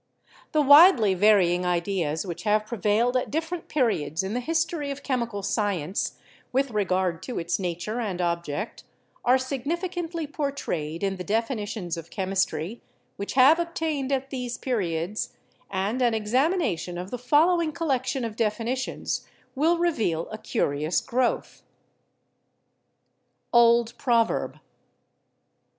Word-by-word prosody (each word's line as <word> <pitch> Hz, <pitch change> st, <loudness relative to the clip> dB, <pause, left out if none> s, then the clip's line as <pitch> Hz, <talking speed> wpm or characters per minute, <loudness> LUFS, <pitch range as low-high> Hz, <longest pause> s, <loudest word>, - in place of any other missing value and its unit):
The 305 Hz, -1 st, +3 dB
widely 285 Hz, -, +7 dB
varying 185 Hz, -3 st, +4 dB
ideas 175 Hz, -2 st, -1 dB
which 175 Hz, -1 st, -5 dB
have 215 Hz, 0 st, +2 dB
prevailed 225 Hz, +3 st, +1 dB
at 255 Hz, -, 0 dB
dif 320 Hz, +3 st, -1 dB
ferent 355 Hz, -2 st, -5 dB
periods 190 Hz, -, 0 dB
in 190 Hz, +2 st, -3 dB
the 245 Hz, -, 0 dB
history 325 Hz, +1 st, -1 dB
of 280 Hz, 0 st, -6 dB
chemical 235 Hz, -6 st, -2 dB
science, 195 Hz, -5 st, -1 dB, 0.3 s
with 270 Hz, 0 st, +1 dB
regard 185 Hz, -5 st, 0 dB
to 250 Hz, -, -5 dB
its 170 Hz, +2 st, -1 dB
nature 180 Hz, +5 st, -3 dB
and 195 Hz, -6 st, -3 dB
object, 170 Hz, +2 st, -2 dB, 0.4 s
are 250 Hz, +2 st, +5 dB
significantly 330 Hz, +6 st, -3 dB
por 285 Hz, -1 st, -2 dB
trayed 165 Hz, -, -4 dB
in 195 Hz, -1 st, 0 dB
the 180 Hz, -, -5 dB
definitions 210 Hz, -5 st, -2 dB
of 165 Hz, 0 st, -8 dB
chemistry 190 Hz, 0 st, -2 dB, 0.4 s
which 200 Hz, -, -4 dB
have 275 Hz, +6 st, +6 dB
obtained 320 Hz, -5 st, -2 dB
at 270 Hz, 0 st, -1 dB
these 250 Hz, -2 st, -4 dB
periods, 190 Hz, -5 st, -2 dB, 0.4 s
and 200 Hz, +6 st, -1 dB
an 240 Hz, -2 st, +3 dB
examination 220 Hz, -, 0 dB
of 180 Hz, +2 st, -6 dB
the 250 Hz, -, -4 dB
following 315 Hz, +6 st, +3 dB
col 330 Hz, 0 st, -4 dB
lection 260 Hz, -1 st, 0 dB
of 220 Hz, -2 st, -5 dB
definitions 230 Hz, +4 st, -2 dB, 0.3 s
will 320 Hz, +5 st, +2 dB
reveal 225 Hz, -, 0 dB
a 215 Hz, -, -6 dB
curious 155 Hz, -, 0 dB
growth: 250 Hz, 0 st, -1 dB, 1.9 s
Old 235 Hz, 0 st, +5 dB
Proverb. 235 Hz, -3 st, +1 dB
230 Hz, 130 wpm, -26 LUFS, 185-275 Hz, 1.9 s, widely